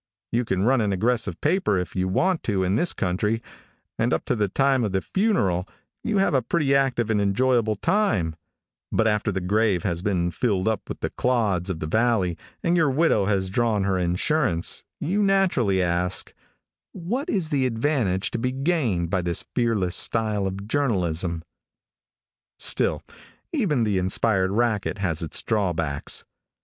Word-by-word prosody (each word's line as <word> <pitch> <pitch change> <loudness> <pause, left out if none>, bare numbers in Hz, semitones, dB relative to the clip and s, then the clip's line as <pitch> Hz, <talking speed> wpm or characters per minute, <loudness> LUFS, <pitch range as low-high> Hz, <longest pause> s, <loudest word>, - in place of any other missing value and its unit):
You 120 +1 +1
can 95 -3 0
run 130 +2 +3
an 105 -2 0
aggressive 105 -1 0
paper 155 - +1
if 90 -1 -4
you 95 0 0
want 175 - +1
to 100 -4 0
in 95 +2 +1
this 170 +10 +2
country, 105 +5 -1 0.6
and - - +1
up - - -1
to 125 - 0
the 105 -2 +1
time 135 +4 +2
of 105 -3 -2
the 95 - +2
funeral 100 - 0 0.3
you 215 -3 0
have 195 -4 +2
a 135 - +3
pretty 140 +2 +1
active 130 -5 +1
and 105 -2 +2
enjoyable 110 +2 +2
time, 110 - +1 0.6
but 110 - +2
after 105 0 +1
the 95 - -2
grave 100 0 +1
has 85 -4 -1
been 90 -4 0
filled 95 +1 0
up 110 -2 -1
with - - -6
the - - -2
clods 105 -8 0
of 90 -4 -3
the - - -2
valley 110 -1 +1 0.3
and 170 +1 +2
your 160 -4 +3
widow 135 -8 +2
has 95 -3 0
drawn 115 -3 +1
her 95 -1 0
insurance, 90 - 0 0.2
you 190 +7 0
naturally 175 - +2
ask, 90 +2 -1 0.6
"What 215 - -3
is 180 -7 -1
the 135 -4 +1
advantage 115 -6 0
to - - -3
be 125 +2 -1
gained 130 - 0
by 95 - +1
this 85 -1 -2
fearless 105 -7 +1
style 105 -3 +1
of 100 +1 -6
journalism?" 90 - -1 1.1
Still, - - +1 0.5
even 175 - +1
the 105 -4 +1
inspired 95 +1 +1
racket 105 -1 0
has 90 -6 -1
its 80 - -3
drawbacks. 85 -9 -1
105 Hz, 165 wpm, -24 LUFS, 95-130 Hz, 1.1 s, run